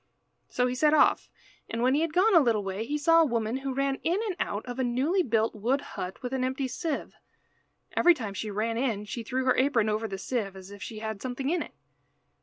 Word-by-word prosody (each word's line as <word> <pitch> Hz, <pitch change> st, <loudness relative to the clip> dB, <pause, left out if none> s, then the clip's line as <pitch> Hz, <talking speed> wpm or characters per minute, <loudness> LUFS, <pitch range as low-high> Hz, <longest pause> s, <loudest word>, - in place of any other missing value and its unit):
So 250 Hz, -, +1 dB
he 250 Hz, -, 0 dB
set 300 Hz, +4 st, +3 dB
off, -, -, +3 dB, 0.4 s
and 230 Hz, +1 st, -2 dB
when 255 Hz, +1 st, +4 dB
he 295 Hz, -, +2 dB
had 330 Hz, -1 st, 0 dB
gone 385 Hz, +6 st, +4 dB
a 340 Hz, -, +8 dB
little 230 Hz, -7 st, +2 dB
way 195 Hz, +3 st, -3 dB
he 295 Hz, -, -1 dB
saw 330 Hz, +3 st, +5 dB
a -, -, +5 dB
woman 230 Hz, -2 st, -1 dB
who 270 Hz, 0 st, -4 dB
ran 275 Hz, +1 st, -1 dB
in 350 Hz, +4 st, +1 dB
and 395 Hz, -5 st, -2 dB
out 205 Hz, -, -2 dB
of 245 Hz, 0 st, -6 dB
a -, -, +2 dB
newly 265 Hz, +10 st, +1 dB
built 225 Hz, -7 st, +1 dB
wood 240 Hz, +6 st, 0 dB
hut 185 Hz, +7 st, -6 dB
with 250 Hz, +1 st, -4 dB
an 260 Hz, -1 st, 0 dB
empty 260 Hz, +1 st, -1 dB
sieve. 310 Hz, +3 st, -3 dB, 0.8 s
Every 350 Hz, -1 st, +6 dB
time 220 Hz, -8 st, -5 dB
she 215 Hz, +2 st, -4 dB
ran 220 Hz, +3 st, -1 dB
in 225 Hz, -6 st, -1 dB
she 235 Hz, +3 st, -5 dB
threw 255 Hz, +3 st, -2 dB
her 255 Hz, -, +4 dB
apron 255 Hz, -5 st, +2 dB
over 215 Hz, +1 st, -1 dB
the 195 Hz, -2 st, -5 dB
sieve, 200 Hz, -1 st, -3 dB
as 190 Hz, +1 st, -11 dB
if 205 Hz, 0 st, -11 dB
she 220 Hz, -, -6 dB
had 220 Hz, -2 st, -5 dB
something 265 Hz, +3 st, -2 dB
in 350 Hz, -1 st, +1 dB
it. -, -, -8 dB
250 Hz, 240 wpm, -28 LUFS, 220-280 Hz, 0.8 s, a